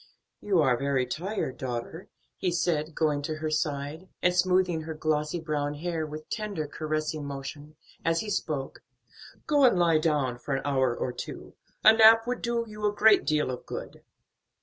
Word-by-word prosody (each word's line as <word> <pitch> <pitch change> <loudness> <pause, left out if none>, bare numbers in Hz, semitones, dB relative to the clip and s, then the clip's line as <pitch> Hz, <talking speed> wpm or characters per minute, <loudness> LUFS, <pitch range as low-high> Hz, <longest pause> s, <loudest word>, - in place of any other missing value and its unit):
"You 190 -6 +2
are 125 -3 +3
very 140 -2 +1
tired, 160 - -4
daughter," 125 +7 -5 0.3
he 180 - -1
said, 165 -2 -1
going 150 -2 +1
to 155 +2 -3
her 155 0 -3
side, 150 +3 -2
and 180 - +4
smoothing 180 -2 +2
her 160 0 -6
glossy 155 +1 -1
brown 150 -2 -2
hair 160 0 -3
with 155 +1 -8
tender 205 -8 -3
caressing 155 0 -3
motion, 145 +2 -7 0.3
as 165 0 +1
he 215 - -5
spoke; 150 -8 -3 0.6
"go 290 -2 +3
and 245 -8 +5
lie 170 -3 +4
down 145 -6 0
for 135 +2 -2
an 135 - -4
hour 130 -4 +1
or 125 - -2
two. - - -8 0.3
A 220 - +9
nap 225 0 +7
would 250 +1 -3
do 235 -1 -1
you 210 0 -9
a - - +1
great 210 +1 +5
deal 150 -4 +1
of 125 - -8
good." - - -7
155 Hz, 175 wpm, -28 LUFS, 145-180 Hz, 0.6 s, A